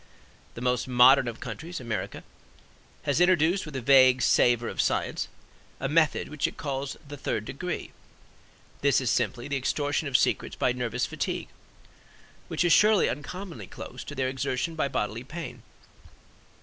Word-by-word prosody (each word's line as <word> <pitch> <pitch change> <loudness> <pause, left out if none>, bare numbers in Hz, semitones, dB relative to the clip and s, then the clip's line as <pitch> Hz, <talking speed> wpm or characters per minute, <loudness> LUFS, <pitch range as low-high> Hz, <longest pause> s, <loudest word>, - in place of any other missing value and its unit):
The 115 - -7
most 125 0 0
modern 130 +1 +6
of 120 -1 -5
countries, 170 +3 -6
America, 115 -4 -4 0.8
has 145 +4 +1
introduced 180 0 +3
with 150 - -8
a 130 - -2
vague 130 -1 +6
savor 120 -1 +3
of - - -1
science, - - -1 0.5
a 135 - -1
method 155 +1 +2
which 150 -2 -1
it - - -9
calls 140 -2 -4
"the 145 +1 -8
third - - -2
degree." - - -5 0.9
This 140 -1 +4
is 130 -3 0
simply 120 +1 -1
the 140 -1 -1
extortion 145 +3 -1
of 135 - +4
secrets - - 0
by 125 - +1
nervous 125 0 -2
fatigue; - - -3 1.0
which - - 0
is 175 - +5
surely 210 -1 +5
uncommonly 180 +6 -6
close - - -9
to 145 - -7
their 130 -1 0
extortion 130 +4 -2
by 155 -3 0
bodily 110 -2 -3
pain. 160 +5 -7
135 Hz, 155 wpm, -27 LUFS, 125-155 Hz, 1.0 s, modern